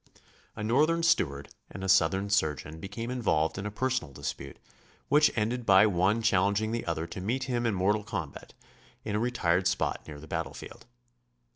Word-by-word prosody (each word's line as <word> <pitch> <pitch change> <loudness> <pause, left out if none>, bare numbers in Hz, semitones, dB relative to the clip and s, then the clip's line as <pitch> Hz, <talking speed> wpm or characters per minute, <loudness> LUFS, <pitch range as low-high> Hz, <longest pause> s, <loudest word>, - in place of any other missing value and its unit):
A 105 - -5
Northern 155 +9 +2
steward 70 - +1 0.2
and 95 - -8
a - - -2
Southern 95 +2 +3
surgeon 80 -4 -1
became 110 +7 -6
involved 100 -9 0
in 100 - -4
a - - -2
personal 130 - -2
dispute, 70 -1 -6 0.5
which 150 +1 +5
ended 120 +3 -1
by 100 -1 +6
one 100 +3 +1
challenging 100 +1 +2
the 115 -4 -3
other 80 -1 -2
to 85 +2 -7
meet 120 +7 -1
him 120 -2 -1
in 110 - 0
mortal 105 +3 +1
combat 100 -10 -6 0.5
in 105 -1 -2
a - - +1
retired 95 -7 +1
spot - - -1
near 75 -1 -9
the 75 - -11
battlefield. - - -6
100 Hz, 170 wpm, -29 LUFS, 85-115 Hz, 0.5 s, by